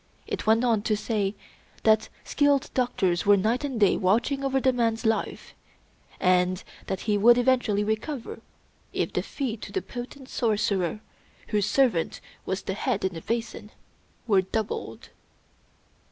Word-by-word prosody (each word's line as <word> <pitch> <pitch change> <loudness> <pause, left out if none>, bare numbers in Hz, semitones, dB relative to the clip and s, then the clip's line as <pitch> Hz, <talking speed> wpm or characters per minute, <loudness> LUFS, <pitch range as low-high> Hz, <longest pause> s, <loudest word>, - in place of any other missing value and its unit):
It - - -5
went 225 +2 +4
on 230 -4 +2
to 215 0 0
say 210 -2 -1 0.5
that 220 0 +3
skilled 285 -2 +2
doctors 195 -9 0
were 205 0 +7
night 225 +7 0
and 270 -5 -3
day 200 -3 +4
watching 235 +9 +1
over 270 0 +1
the 260 0 +2
man's 230 -1 0
life; 225 0 -1 0.7
and 180 0 +2 0.2
that 190 -1 -3
he 210 -2 +1
would 240 +3 +7
eventually 245 -5 +2
recover 220 +5 -3 0.5
if - - -1
the - - 0
fee 255 -5 -4
to - - -9
the 385 - -2
potent 255 +2 -8
sorcerer, 210 -5 0 0.5
whose 210 -3 +1
servant 240 -12 +2 0.3
was 190 0 -2
the 190 - -3
head 210 -1 -1
in 190 - -1
the 165 - -7
basin, 225 -1 -4 0.6
were 200 -4 +4
doubled. 210 +3 -4
220 Hz, 150 wpm, -26 LUFS, 200-250 Hz, 0.7 s, were